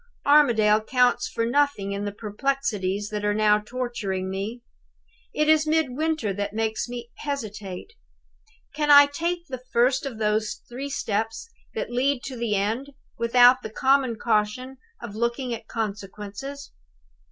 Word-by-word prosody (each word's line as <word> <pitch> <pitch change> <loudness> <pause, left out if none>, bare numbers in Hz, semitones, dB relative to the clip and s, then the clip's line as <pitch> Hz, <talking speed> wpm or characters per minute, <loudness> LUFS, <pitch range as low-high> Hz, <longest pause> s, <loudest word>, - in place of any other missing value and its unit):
"Armadale 230 -8 +5
counts 250 +1 +2
for 230 - -1
nothing 240 -6 +1
in 200 +1 -3
the 205 - -2
perplexities 210 -3 -2
that 210 -1 -4
are 205 0 +1
now 210 -1 +4
torturing 210 -5 -4
me. 210 +5 -5 0.7
It 305 0 0
is 310 0 +4
Midwinter 310 -6 0
who 205 +2 -2
makes 220 +2 -2
me 240 -1 -7
hesitate. 215 - -5 0.8
Can 295 0 -1
I 285 0 +10
take 340 +4 -3
the 255 -6 -7
first 255 +4 +2
of 245 -5 -7
those 215 0 -1
three 265 +4 -6
steps 225 - -2 0.3
that 450 - -3
lead 260 +4 +2
me - - -11
to 265 - -6
the 230 -3 -1
end, 225 +8 -2 0.3
without 245 +2 +6
the 220 - -6
common 265 +1 +2
caution 225 +4 -1 0.2
of 235 -4 -8
looking 235 +2 -1
at 230 - -7
consequences? 210 +5 -6
235 Hz, 145 wpm, -25 LUFS, 210-275 Hz, 0.8 s, I